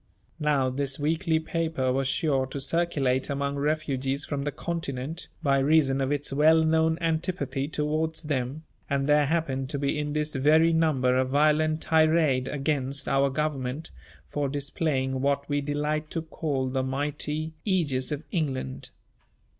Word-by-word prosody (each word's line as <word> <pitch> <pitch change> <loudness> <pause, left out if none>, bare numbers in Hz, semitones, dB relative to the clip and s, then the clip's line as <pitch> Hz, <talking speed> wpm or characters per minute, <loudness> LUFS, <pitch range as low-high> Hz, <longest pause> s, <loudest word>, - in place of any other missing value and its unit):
Now 145 -4 +2
this 135 0 -2
weekly 160 +2 +1
paper 160 -5 -1
was 135 0 0
sure 135 -2 +1
to 140 - -5
circulate 135 -4 0
among 140 0 -1
refugees 140 -2 -1
from 140 -1 -3
the 145 - -1
continent, 160 -1 -4 0.2
by 140 -2 +3
reason 140 -1 +3
of 135 +1 0
its 145 -1 0
well 160 +3 +5
known 160 0 +2
antipathy 165 -4 -1
towards 155 +2 -1
them; 140 0 -2 0.3
and 140 -1 +1
there 150 0 +4
happened 135 -5 -1
to 145 - -2
be 140 +2 -1
in 150 0 -2
this 150 0 -1
very 155 +4 +4
number 140 -6 +2
a 130 - +3
violent 155 +3 +2
tirade 155 -5 +3
against 140 -1 -2
our 135 0 +3
Government 140 0 -3 0.4
for 145 -2 -2
displaying 135 -2 -1
what 140 0 0
we 145 0 0
delight 150 +2 -2
to 165 - -3
call 145 -5 -2
the 130 +1 -1
mighty 150 +3 -2
Ægis 145 -10 +1
of 150 +1 -3
England. 130 - -2
145 Hz, 150 wpm, -27 LUFS, 135-155 Hz, 0.4 s, well